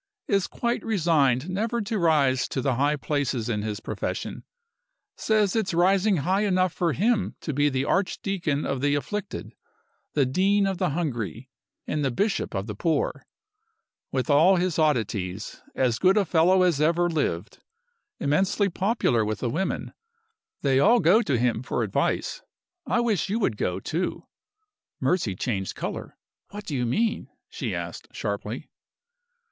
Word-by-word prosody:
Is 195 -2 +1
quite 235 0 -2
resigned 155 - +2
never 220 +6 -1
to 210 0 -2
rise 145 -6 +3
to - - -3
the 130 0 +1
high 145 +4 +2
places 140 -5 -1
in 105 -3 -1
his 105 -1 -3
profession. - - -4 0.7
Says 215 -3 +1
it's 200 -6 0
rising 190 +3 +3
high 190 +2 +2
enough 185 -4 +2
for 170 -3 0
him 215 +3 +1
to 155 - -3
be 145 +2 +3
the 135 0 -1
Archdeacon 185 -5 -1
of 135 -2 -2
the 145 0 +2
afflicted, 205 +7 -4 0.6
the 140 -3 +4
Dean 195 +9 +2
of 195 -2 -1
the 185 -3 +1
hungry, 125 - -3 0.3
and 150 -1 -1
the 135 - +2
Bishop 200 - -1
of 95 0 -2
the 105 - -5
poor. 155 +8 -1 0.8
With 130 -1 -1
all 160 +6 +5
his 180 -2 0
oddities, 105 - -1
as 125 -3 +1
good 190 +2 +4
a 205 - +3
fellow 180 +3 +4
as 170 -5 +2
ever 170 +3 +3
lived. 125 - -2 0.6
Immensely 190 +7 +1
popular 190 - +1
with 110 0 -2
the 120 - -2
women. 190 +8 -2 0.7
They 135 -2 +3
all 230 - +5
go 185 +7 +5
to 140 - 0
him 120 -1 +1
for 125 - -2
advice. - - -1 0.5
I 240 - +2
wish 215 -6 0
you 210 - 0
would 195 - 0
go, 90 -2 -1
too." 170 - -3 0.7
Mercy 145 - 0
changed 95 -2 -2
color. - - -5 0.3
"What 205 0 -8
do 150 - -4
you 125 -2 0
mean?" 220 - 0 0.2
she - - -3
asked, - - -6
sharply. - - -4
160 Hz, 155 wpm, -26 LUFS, 130-195 Hz, 0.8 s, all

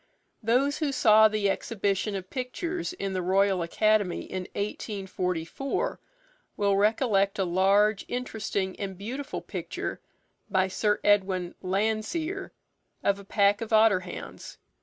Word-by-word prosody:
Those 255 +6 +2
who 300 -3 0
saw 220 -4 +6
the 215 -1 0
exhibition 200 0 -1
of 185 -1 -6
pictures 335 +8 -3
in 195 - -4
the 185 - -1
Royal 190 +1 +2
Academy 205 +2 +1
in 185 -1 -5
1844 195 +1 -3 0.6
will 200 -1 +2
recollect 205 -1 +2
a 195 - +1
large, 195 +4 +3
interesting, 215 -6 -3
and 195 -2 -4
beautiful 260 +9 -5
picture - - -5 0.5
by 190 -1 +2
Sir 210 +2 +1
Edwin 190 -3 +2
Landseer 220 - -1 0.5
of 200 0 +2
a - - -10
pack 200 +1 +2
of 230 0 -5
otter 215 -3 +5
hounds. 185 -1 -9
205 Hz, 125 wpm, -27 LUFS, 190-225 Hz, 0.6 s, saw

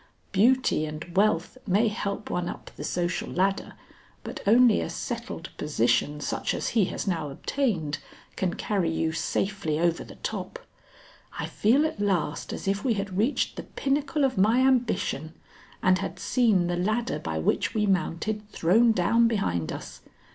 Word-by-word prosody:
Beauty 215 -6 +3
and 155 +3 -8
wealth 200 +3 +2
may 210 +5 +3
help 205 -1 -3
one 175 0 -1
up - - -8
the - - -7
social 175 0 -2
ladder, 195 +2 0 0.5
but - - -6
only 235 +1 +6
a - - -3
settled 195 +1 -5
position 145 +1 +1
such - - -2
as - - -2
he 220 -5 +3
has - - -4
now 165 -6 -1
obtained, 165 - -1 0.4
can 180 -2 -1
carry 195 -6 0
you 160 0 0
safely 180 -1 -1
over 170 0 +1
the - - -12
top. - - -5 0.8
I - - -2
feel 255 +9 +3
at 315 -8 -3
last 180 -7 -1
as - - -6
if 200 +1 0
we 240 -4 +2
had 195 -2 -4
reached 220 +9 0
the - - -4
pinnacle 280 +2 0
of 260 -7 -1
my 225 +6 +4
ambition 240 - +1 0.5
and 185 0 +4
had 195 - -4
seen 220 -8 +2
the 175 0 -1
ladder 215 +6 0
by 80 -1 -3
which 80 - 0
we 210 -1 +2
mounted 205 +2 -1
thrown 220 +7 +4
down 230 +5 +3
behind 90 - -1
us. - - -8
195 Hz, 160 wpm, -27 LUFS, 170-230 Hz, 0.8 s, only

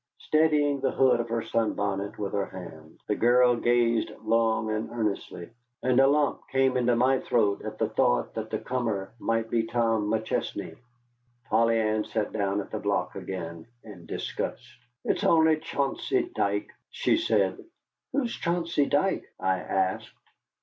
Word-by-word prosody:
Steadying 150 -2 +2
the 135 0 +1
hood 130 -2 +3
of 120 0 -3
her 115 0 -1
sunbonnet 100 -3 -1
with 100 -2 -4
her 100 -1 0
hand, 80 -4 -11
the - - +1
girl 120 +2 +4
gazed 120 -1 +2
long 110 0 +1
and 110 +1 -2
earnestly, 105 -5 -3 0.3
and 130 0 +3
a 135 - +6
lump 145 0 +2
came 135 -1 +2
into 125 -1 +2
my 130 +2 +3
throat 105 -4 +1
at 110 0 -6
the 110 - +1
thought - - +1
that - - -5
the - - -1
comer 115 -6 -3
might 115 0 -1
be 115 - +3
Tom 115 -3 +1
McChesney. 110 0 -2 0.8
Polly 115 0 +3
Ann 110 -1 +1
sat 105 -1 -3
down 100 -1 0
at - - -11
the - - -3
block - - -1
again 85 -3 -6 0.2
in 95 -6 -12
disgust. - - -4 0.4
"It's - - 0
only 160 -1 +4
Chauncey 165 - -1
Dike," 100 +1 -1 0.2
she - - +1
said. 100 -4 +1 0.5
"Who's 245 -5 -1
Chauncey 170 -4 0
Dike?" 150 +7 +1
I 95 0 +1
asked. 95 +1 -1
115 Hz, 155 wpm, -27 LUFS, 100-130 Hz, 0.8 s, a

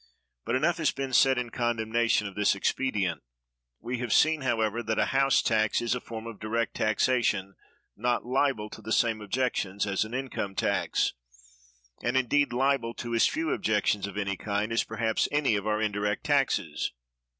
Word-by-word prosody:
But - - 0
enough 165 +6 +2
has 160 -3 +2
been 135 -1 -5
said 130 +2 +5
in 120 -1 -3
condemnation 115 -2 +1
of 100 - -5
this 105 0 +2
expedient. 100 -4 -1 0.6
We 120 +2 -4
have 120 -3 -3
seen, 155 -1 +4
however, 115 -3 0
that 110 -2 -2
a - - +3
house 135 0 +3
tax 110 -1 +2
is 120 0 0
a 125 - -3
form 115 -1 -7
of 115 -3 -8
direct 115 +1 -1
taxation 110 -3 +1 0.4
not 120 +2 0
liable 130 -4 0
to - - -10
the 110 +1 -7
same 115 -2 +2
objections 105 -3 -1
as 100 0 0
an 110 +3 -6
income 125 -7 -4
tax, - - 0 0.9
and 125 +2 0
indeed 145 +3 +2
liable 125 -2 +1
to 120 -1 -5
as 115 - +4
few 320 +1 -1
objections 105 - +1
of 100 0 -8
any 100 -1 -2
kind 105 +1 -2
as 115 - +2
perhaps 110 0 0
any 145 -6 +2
of 100 +1 -2
our 105 0 +1
indirect 105 -1 -1
taxes. - - 0
115 Hz, 175 wpm, -28 LUFS, 105-130 Hz, 0.9 s, said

